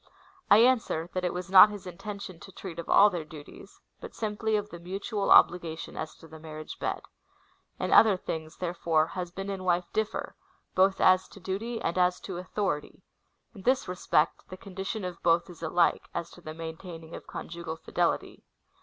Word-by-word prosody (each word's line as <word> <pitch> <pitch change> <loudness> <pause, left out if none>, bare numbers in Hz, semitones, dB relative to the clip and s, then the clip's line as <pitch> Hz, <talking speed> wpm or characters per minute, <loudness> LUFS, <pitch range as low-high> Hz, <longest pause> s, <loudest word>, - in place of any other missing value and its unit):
I 205 - +8
answer, 225 -8 +3
that 185 - -2
it 180 - +1
was 180 +1 -6
not 195 +2 +10
his 205 -2 -8
intention 190 0 -7
to 195 - -12
treat 180 -3 -8
of 170 - -7
all 205 +1 +7
their 175 -3 -3
duties, 150 -1 -13 0.2
but 470 - -10
simply 215 0 -1
of 205 0 -2
the 170 - -8
mutual 195 +4 -3
obligation 170 -2 +4
as 155 - -5
to 165 - -15
the 160 0 -12
mar 155 -1 -9
riage 155 0 -8
bed. - - -2 0.7
In - - -1
other 215 -4 +7
things, 160 -2 -6
therefore, 170 -3 +1
husband 185 +3 -5
and 195 -1 -4
Avife 180 -1 +1
differ, 220 -1 -2 0.4
both 190 +1 +3
as 185 0 +5
to - - -14
duty 205 +6 -3
and 170 +2 -1
as 180 0 +3
to 190 -3 -6
authority: 185 -4 -3 0.5
in 200 - -11
this 260 +6 +2
respect 175 -3 +1
the 185 - -8
condition 195 +1 -5
of 180 -1 -6
both 170 +1 +2
is 170 - -14
alike 170 +1 +1
— - - -40
as 170 -1 -3
to 175 - -14
the 155 -1 -8
maintaining 165 0 -8
of - - -9
con - - -7
jugal 170 -1 -6
fidelity. 165 - -2
180 Hz, 190 wpm, -28 LUFS, 165-200 Hz, 0.7 s, not